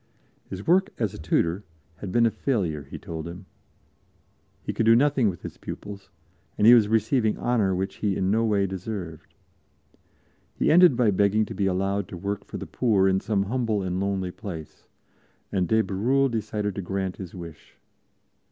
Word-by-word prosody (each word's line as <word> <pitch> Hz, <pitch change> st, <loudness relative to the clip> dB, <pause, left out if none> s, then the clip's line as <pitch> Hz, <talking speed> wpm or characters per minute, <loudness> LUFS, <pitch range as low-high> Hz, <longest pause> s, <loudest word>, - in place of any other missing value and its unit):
His 95 Hz, +1 st, -7 dB
work 190 Hz, +4 st, +3 dB
as 110 Hz, -5 st, -1 dB
a -, -, -9 dB
tutor 85 Hz, +4 st, 0 dB, 0.3 s
had 95 Hz, +2 st, -6 dB
been 120 Hz, +4 st, +4 dB
a 115 Hz, -, +3 dB
failure, 95 Hz, -, -1 dB
he -, -, -8 dB
told 80 Hz, 0 st, -7 dB
him; 90 Hz, +3 st, -9 dB, 1.2 s
he -, -, -3 dB
could 115 Hz, -, 0 dB
do 115 Hz, -, +7 dB
nothing 135 Hz, -3 st, +3 dB
with 85 Hz, -, -7 dB
his -, -, -8 dB
pupils, 100 Hz, -1 st, -8 dB, 0.5 s
and 105 Hz, -, +2 dB
he 120 Hz, -, +10 dB
was 115 Hz, -4 st, +6 dB
receiving 110 Hz, +1 st, +1 dB
honor 110 Hz, -6 st, +1 dB
which 95 Hz, +1 st, -3 dB
he 100 Hz, -3 st, 0 dB
in 95 Hz, 0 st, 0 dB
no 110 Hz, +2 st, +2 dB
way 105 Hz, -3 st, +2 dB
deserved. 95 Hz, -3 st, -6 dB, 1.2 s
He -, -, +2 dB
ended 175 Hz, -5 st, +6 dB
by 120 Hz, -4 st, +3 dB
begging 100 Hz, +2 st, +2 dB
to -, -, -7 dB
be 100 Hz, -, 0 dB
allowed 95 Hz, +1 st, -1 dB
to 90 Hz, -, -8 dB
work 100 Hz, +3 st, -4 dB
for -, -, -7 dB
the -, -, -6 dB
poor 105 Hz, -6 st, +2 dB
in 95 Hz, 0 st, +2 dB
some 100 Hz, -1 st, 0 dB
humble 110 Hz, -2 st, -1 dB
and 90 Hz, 0 st, -2 dB
lonely 95 Hz, -2 st, -1 dB
place, 90 Hz, -5 st, -9 dB, 0.6 s
and 95 Hz, -3 st, 0 dB
de 110 Hz, +4 st, +3 dB
Bérulle 130 Hz, +8 st, +1 dB
decided 105 Hz, -2 st, -2 dB
to 100 Hz, -, -4 dB
grant 95 Hz, 0 st, -3 dB
his 95 Hz, -2 st, -8 dB
wish. 85 Hz, -4 st, -11 dB
100 Hz, 180 wpm, -25 LUFS, 95-110 Hz, 1.2 s, he